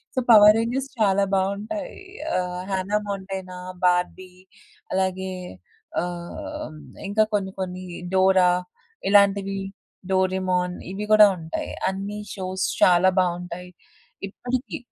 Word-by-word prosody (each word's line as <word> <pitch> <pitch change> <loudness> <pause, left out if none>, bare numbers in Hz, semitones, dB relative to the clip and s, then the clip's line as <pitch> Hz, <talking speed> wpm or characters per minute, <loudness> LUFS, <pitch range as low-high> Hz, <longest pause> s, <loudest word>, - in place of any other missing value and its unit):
So, - - +2
'power 210 -2 +9
Rangers' 260 +4 -2
చాలా 200 -2 +3
బావుంటాయి. 200 +10 -2 0.4
ఆహ్, 180 0 -2
'హన్నా 190 +2 0
మోంటానా,' 190 -2 -5 0.2
'బార్బీ' 180 +1 +1 0.6
అలాగే 190 0 -1 0.7
ఆహ్, 175 -2 -6 0.3
ఇంకా 210 +2 +3
కొన్ని 195 -2 0
కొన్ని 185 0 -4 0.3
'డోరా' 185 -1 +5 0.6
ఇలాంటివి, 200 -1 +4 0.5
'డోరేమోన్' 185 -1 +1
ఇవి 200 +2 -4
గూడా 215 -1 +9
ఉంటాయి. 160 -1 -5 0.2
అన్ని 200 +2 -5 0.2
షోస్ 185 -1 -2 0.2
చాలా 180 +1 +6
బావుంటాయి. 180 0 -3 0.6
ఇప్పడికి 250 +5 -4
190 Hz, 100 wpm, -24 LUFS, 180-200 Hz, 0.7 s, power